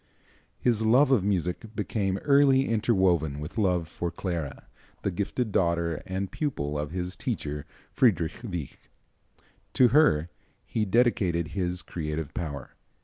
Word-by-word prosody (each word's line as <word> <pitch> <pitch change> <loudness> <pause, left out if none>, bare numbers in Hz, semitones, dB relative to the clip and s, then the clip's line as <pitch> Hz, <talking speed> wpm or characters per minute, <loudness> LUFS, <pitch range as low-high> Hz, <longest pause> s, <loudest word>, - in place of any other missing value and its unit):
His 115 -3 +2
love 130 +5 +5
of 120 -8 +4
music 100 +3 -2
became 100 -2 -1
early 140 -2 +5
interwoven 95 -10 +2
with 75 +9 -5
love 90 -5 +1
for 85 +2 -4
Clara, 85 -7 -4 0.4
the 100 - 0
gifted 105 +5 -2
daughter 85 -3 +1
and 95 0 -3
pupil 75 - -2
of 75 0 -3
his 90 +1 -4
teacher, 75 0 -4 0.3
Friedrich 90 -10 +2
Wieck. 90 - -6 0.8
To 125 -2 +5
her 85 - +4 0.3
he 110 - -1
dedicated 95 -7 +2
his 90 -2 -2
creative 75 -2 -4
power. 70 -5 -5
90 Hz, 130 wpm, -27 LUFS, 80-110 Hz, 0.8 s, love